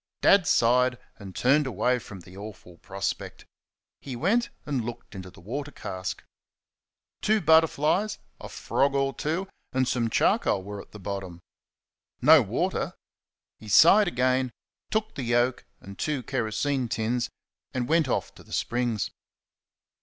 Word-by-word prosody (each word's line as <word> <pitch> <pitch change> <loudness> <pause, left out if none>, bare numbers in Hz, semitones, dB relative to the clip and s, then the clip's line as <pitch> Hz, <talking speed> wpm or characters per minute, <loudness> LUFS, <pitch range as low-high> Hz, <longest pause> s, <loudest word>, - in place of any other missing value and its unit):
Dad 195 -5 +5
sighed 125 +1 +3 0.2
and 95 -3 -10
turned 135 - +3
away 125 +2 +1
from 100 -4 -10
the 90 +2 -14
awful 100 -4 -10
prospect. 100 0 -5 0.6
He 135 -3 -6
went 225 - +1 0.2
and 140 -5 -1
looked 120 -2 -8
into 95 -2 -8
the 85 - -16
water 140 +10 -5
cask. 95 -9 -6 1.0
Two 215 +1 +3
butterflies, 160 +4 +3 0.2
a - - -9
frog 140 0 0
or 135 0 +1
two, 165 +6 -2 0.3
and 130 -1 +1
some 120 -2 0
charcoal 95 -3 +2
were 100 +1 -7
at - - -17
the - - -11
bottom. 95 -3 -5 0.8
No - - +7
water. - - -2 0.6
He 110 - -12
sighed 195 - +7
again, 130 -2 +1 0.4
took 220 0 -1
the - - -5
yoke 120 +1 +1
and 100 0 -12
two 150 -4 -1
kerosene 125 +2 -1
tins, 120 +3 -1 0.4
and 125 -2 -2
went 160 -2 +3
off - - -2
to - - -15
the - - -13
springs. 120 -6 -1
125 Hz, 145 wpm, -26 LUFS, 105-145 Hz, 1.0 s, No